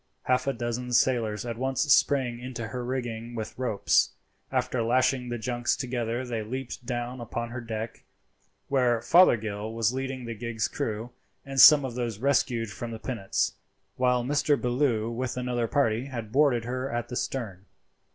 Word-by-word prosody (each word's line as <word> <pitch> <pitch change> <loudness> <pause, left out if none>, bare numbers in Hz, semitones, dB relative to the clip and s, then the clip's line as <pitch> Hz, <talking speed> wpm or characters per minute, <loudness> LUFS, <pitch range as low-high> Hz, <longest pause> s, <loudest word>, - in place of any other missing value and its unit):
Half 125 +1 +1
a 135 - +2
dozen 120 0 -3
sailors 115 -4 +2
at 115 -1 -5
once 130 0 0
sprang 130 -4 +2
into 120 -2 -6
her 125 +2 -4
rigging 120 -2 -4
with 110 -2 -5
ropes. 125 -6 +2 0.4
After 125 - 0
lashing 125 +2 +2
the 120 - -2
junks 120 +1 -1
together 120 -1 -2
they 115 -3 -3
leaped 125 +3 -5
down 120 0 -3
upon 115 0 -4
her 125 +1 -5
deck, 115 -1 -5 0.6
where 125 -4 +2
Fothergill 110 - +4
was 115 0 +1
leading 130 -1 -4
the 115 - -4
gig's 110 0 -2
crew 110 +2 -4 0.3
and 135 0 -3
some 145 +2 +9
of 130 - -4
those 120 -3 -3
rescued 120 -3 +1
from 115 +4 -6
the 115 - -5
pinnace, 110 -5 -1 0.4
while 125 -1 +2
Mr. 145 +2 +2
Bellew, 120 -3 +1
with 125 +1 -3
another 125 -2 -1
party, 115 -2 +1
had 115 -6 -6
boarded 135 -4 +3
her 130 +2 -3
at 120 -1 -3
the 125 - -5
stern. 105 -8 -4
120 Hz, 165 wpm, -27 LUFS, 115-130 Hz, 0.6 s, some